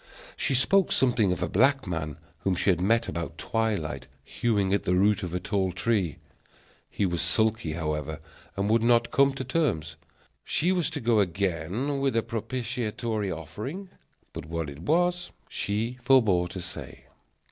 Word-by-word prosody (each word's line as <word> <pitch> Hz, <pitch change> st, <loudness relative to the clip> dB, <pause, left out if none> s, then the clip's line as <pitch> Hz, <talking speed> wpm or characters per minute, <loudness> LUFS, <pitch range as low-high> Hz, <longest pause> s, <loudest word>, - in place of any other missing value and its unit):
She 135 Hz, -, 0 dB
spoke 190 Hz, +9 st, +4 dB
something 120 Hz, -7 st, +3 dB
of 90 Hz, -1 st, -1 dB
a -, -, 0 dB
black 135 Hz, +9 st, +3 dB
man, 80 Hz, -5 st, -4 dB, 0.2 s
whom 95 Hz, -2 st, 0 dB
she 95 Hz, -, +2 dB
had 90 Hz, -1 st, -1 dB
met 115 Hz, +5 st, +2 dB
about 85 Hz, 0 st, -4 dB
twilight 110 Hz, -6 st, -2 dB, 0.2 s
hewing 100 Hz, -5 st, 0 dB
at 100 Hz, -, +2 dB
the 90 Hz, -, +1 dB
root 100 Hz, +1 st, +3 dB
of 90 Hz, -4 st, -4 dB
a 90 Hz, -, -1 dB
tall 95 Hz, 0 st, 0 dB
tree. 90 Hz, -3 st, 0 dB, 0.7 s
He 100 Hz, -, -1 dB
was 85 Hz, -2 st, 0 dB
sulky, 110 Hz, -7 st, +1 dB
however, 75 Hz, -1 st, -3 dB, 0.4 s
and 100 Hz, +1 st, 0 dB
would 110 Hz, +2 st, +3 dB
not 120 Hz, 0 st, +3 dB
come 140 Hz, 0 st, +4 dB
to 135 Hz, -, -4 dB
terms; 125 Hz, -, -1 dB, 0.5 s
she 175 Hz, +4 st, +1 dB
was 180 Hz, -4 st, +1 dB
to 160 Hz, -2 st, -5 dB
go 115 Hz, -2 st, +3 dB
again 95 Hz, -, -1 dB
with 135 Hz, -3 st, 0 dB
a 115 Hz, -, +2 dB
propitiatory 115 Hz, -2 st, -3 dB
offering, 105 Hz, -, -6 dB, 0.4 s
but 80 Hz, -, -7 dB
what 80 Hz, -2 st, -3 dB
it 70 Hz, -, -11 dB
was 175 Hz, -, +1 dB, 0.2 s
she 115 Hz, +5 st, -2 dB
forbore 110 Hz, -9 st, +4 dB
to 90 Hz, +1 st, -7 dB
say. 90 Hz, -, -9 dB
105 Hz, 165 wpm, -27 LUFS, 90-125 Hz, 0.7 s, spoke